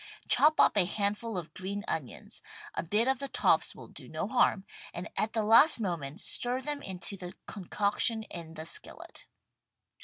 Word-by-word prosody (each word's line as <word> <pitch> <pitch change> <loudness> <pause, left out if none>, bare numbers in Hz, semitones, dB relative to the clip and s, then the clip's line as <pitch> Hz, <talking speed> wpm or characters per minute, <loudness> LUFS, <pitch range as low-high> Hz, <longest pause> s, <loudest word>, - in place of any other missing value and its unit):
Chop 310 +1 +5
up - - +5
a 190 - +5
handful 205 +2 -2
of 170 -3 -6
green 200 +3 -5
onions, 150 -6 -5 0.3
a - - -1
bit 210 +8 +1
of 265 -1 +2
the 275 - -3
tops - - +2
will - - -11
do - - -12
no - - -3
harm, 195 -1 +2 0.3
and 175 0 -4
at 215 - 0
the 220 - +1
last 230 +7 +7
moment 170 -6 -3
stir 245 +3 0
them 290 +2 -4
into 190 -1 -4
the 180 -1 -8
concoction 210 +3 -1
in 165 -5 -9
the 160 - -7
skillet. - - -8
205 Hz, 175 wpm, -30 LUFS, 180-230 Hz, 0.3 s, last